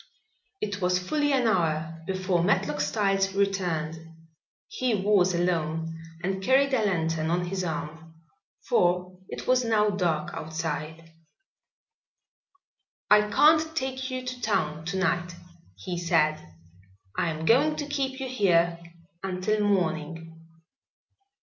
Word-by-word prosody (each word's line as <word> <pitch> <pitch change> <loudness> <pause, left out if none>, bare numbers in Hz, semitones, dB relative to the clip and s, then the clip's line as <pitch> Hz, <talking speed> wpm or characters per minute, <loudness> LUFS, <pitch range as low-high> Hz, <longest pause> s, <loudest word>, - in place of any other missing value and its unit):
It 205 -1 -3
was 180 0 +2
fully 290 +11 0
an 260 -3 +2
hour 165 -5 0
before 185 -2 0
Matlock 150 -6 +1
Styles 195 +4 +1
returned. 175 -6 -1 0.7
He 250 -3 -1
was 190 -2 +3
alone 165 -2 -1 0.3
and 190 +1 -2
carried 270 +5 +3
a 235 -4 +2
lantern 165 -5 0
on 175 +1 0
his 185 +1 -3
arm, 160 0 -5 0.5
for 180 +1 +1
it - - -6
was 255 0 +3
now 215 -2 +2
dark 170 -6 -1
outside. 160 0 -5 2.0
"I 210 0 +6
can't 315 +6 +4
take 260 -2 -3
you 255 0 -4
to 250 0 -5
town 160 -8 -1
to 185 +3 -2
night," 175 -1 0 0.4
he 170 - -5
said. 155 - +1 0.6
"I 170 - 0
am 160 0 -4
going 285 - +4
to 295 - -3
keep 270 -2 -2
you 265 - -3
here 175 -8 +2 0.4
until 195 +3 -1
morning." 165 -4 -1
180 Hz, 125 wpm, -27 LUFS, 165-215 Hz, 2.0 s, I